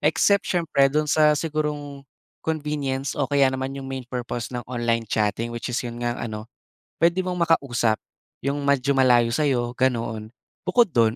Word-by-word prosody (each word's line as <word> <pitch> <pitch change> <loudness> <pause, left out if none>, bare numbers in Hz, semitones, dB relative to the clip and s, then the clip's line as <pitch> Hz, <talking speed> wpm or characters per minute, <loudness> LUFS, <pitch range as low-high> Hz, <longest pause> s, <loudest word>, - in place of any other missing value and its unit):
except 160 +7 +3
siyempre 160 -6 +3
dun 150 +2 +1
sa 150 -1 +5
sigurong 145 -3 -3 0.3
convenience 145 -3 -2
o 140 - +1
kaya 140 -2 +4
naman 130 +1 -3
yung 135 - -6
main 130 -2 -5
purpose 120 -2 -4
ng 120 - -4
online 120 -2 -1
chatting 110 +2 -1
which 120 +1 -4
is 120 - -1
yun 120 0 -5
ngang 120 0 -1
ano, 110 -2 -5 0.5
puwede 170 +3 +3
mong 180 -1 -3
makausap 130 -10 +2 0.5
yung 140 +1 -1
medyo 140 0 +2
malayo 125 -3 +4
sa‘yo, 125 -4 +1
ganoon. 115 -4 0 0.4
Bukod 215 -1 +4
do’n, 115 -1 +3
135 Hz, 160 wpm, -24 LUFS, 120-150 Hz, 0.5 s, sa